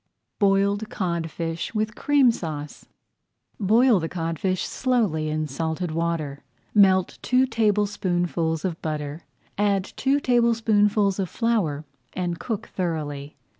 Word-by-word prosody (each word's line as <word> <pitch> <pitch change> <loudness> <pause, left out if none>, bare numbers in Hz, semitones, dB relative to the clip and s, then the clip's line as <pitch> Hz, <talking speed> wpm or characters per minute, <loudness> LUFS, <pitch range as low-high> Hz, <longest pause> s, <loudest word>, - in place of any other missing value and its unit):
BOILED 200 +1 +2
CODFISH 170 0 -3
WITH 215 0 0
CREAM 280 -2 +4
SAUCE 150 -8 -6 0.7
Boil 225 +2 +4
the 165 -1 -3
codfish 175 +2 -2
slowly 210 - 0
in 155 0 -1
salted 160 +4 -3
water. 155 -4 -2 0.3
Melt 190 -3 +4
two 255 +1 +3
tablespoonfuls 185 -8 0
of 170 -3 -3
butter, 150 0 -4 0.3
add 200 -2 +2
two 275 +2 +2
tablespoonfuls 220 -5 +2
of 190 -3 -1
flour, 195 -11 0 0.3
and 175 -2 -3
cook 225 -2 -4
thoroughly. 150 -5 -3
185 Hz, 110 wpm, -24 LUFS, 160-215 Hz, 0.7 s, CREAM